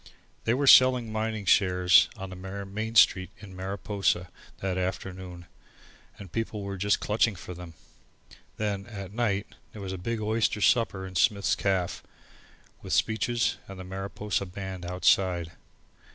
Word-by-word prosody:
They 115 - +2
were 140 +2 0
selling 130 -3 +7
mining 110 -1 -2
shares 90 -2 +5
on 95 -2 -7
the - - -7
Main 100 +4 -5
Street 95 -5 +5
in 100 -2 -12
Mariposa 95 -1 -1 0.3
that 95 -1 -2
afternoon 90 -1 -5 0.7
and 100 -4 -11
people 115 -2 -3
were 100 0 -4
just 100 +2 +1
clutching 105 0 +1
for 90 +1 -8
them. 85 -1 -10 0.8
Then 100 -2 -2
at 100 -4 -8
night 105 -3 -1 0.2
there 105 - -9
was 95 -1 -4
a 95 - -6
big 115 +5 -3
oyster 110 0 0
supper 100 -4 +2
in 95 - -9
Smith's 100 +5 +2
caff, 95 -3 -1 0.8
with - - -4
speeches, 115 +2 +1
and 95 -1 -9
the - - -6
Mariposa 95 +1 -3
band 95 -1 -6
outside. 90 -1 +2
95 Hz, 145 wpm, -27 LUFS, 95-110 Hz, 0.8 s, selling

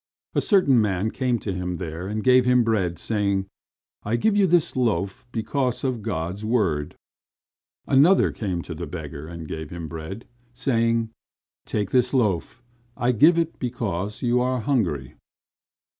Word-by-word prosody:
A - - +2
certain 140 - +4
man 105 +1 0
came 125 -2 0
to 100 -3 -4
him 90 -1 -3
there 85 0 -5
and 105 +1 -3
gave 130 0 +6
him 125 -1 +4
bread, 95 -7 0
saying: 100 -1 0 0.6
"I 110 +3 -1
give 215 - +2
you 200 -2 +4
this 175 -1 +2
loaf, 120 -1 -1
because 125 +2 -1
of 130 -4 -1
God's 90 +3 -3
word." 95 -11 0 0.9
Another 150 +8 +5
came 90 -6 -3
to 85 - -7
the 85 +1 -6
beggar 75 -2 -7
and 85 -1 -8
gave 80 -1 -6
him 85 -2 -6
bread, 85 +7 -7 0.3
saying: 115 -2 +1 0.6
"Take 105 -2 -2
this 125 +1 +2
loaf; 110 0 0 0.3
I 120 +1 +2
give 150 +9 +5
it 165 -1 -1
because 105 -5 -3
you 125 0 +2
are 125 0 0
hungry." 95 - -1
110 Hz, 155 wpm, -24 LUFS, 90-125 Hz, 0.9 s, gave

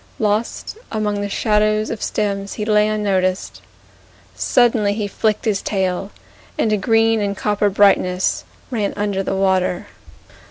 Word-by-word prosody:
Lost 215 - -2
among 210 -2 -1
the 205 - -3
shadows 215 +1 +1
of 225 - -5
stems 200 -1 -2
He 210 - -4
lay 210 -1 +3
unnoticed. 195 -3 -1 0.7
Suddenly 230 -5 +2
he 210 -2 -2
flicked 215 +2 -1
his 210 -3 +1
tail, 190 -1 -1 0.5
And 215 - +1
a - - +2
green 225 +2 +2
and 200 -1 -2
copper 205 0 +1
brightness 190 -2 +2 0.3
Ran 210 -5 -1
under 205 -2 -1
the 195 - -2
water. 190 -2 +1
205 Hz, 135 wpm, -19 LUFS, 195-215 Hz, 0.7 s, lay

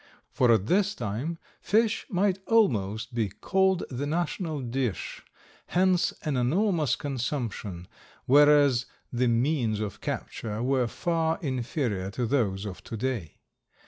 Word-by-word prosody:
For 125 -2 +3
at 110 -4 +3
this 205 - +2
time 120 +9 -3 0.2
fish 220 +1 +1
might 190 0 +1
almost 115 - +2
be 115 -4 0
called 190 - +1
the 135 +3 -3
national 160 0 -2
dish, 120 -5 -3 0.5
hence 180 0 +2
an 150 -4 -1
enormous 160 - +2
consumption, 120 - -4 0.4
whereas 145 -2 +5 0.3
the 125 +1 +2
means 120 -2 +1
of 105 -2 -5
capture 110 0 -4
were 130 -1 +2
far 165 +3 0
inferior 120 - -2
to 125 - +1
those 110 -6 0
of 90 -2 -7
to 115 - -5
day. 115 - -3
130 Hz, 125 wpm, -27 LUFS, 115-165 Hz, 0.5 s, whereas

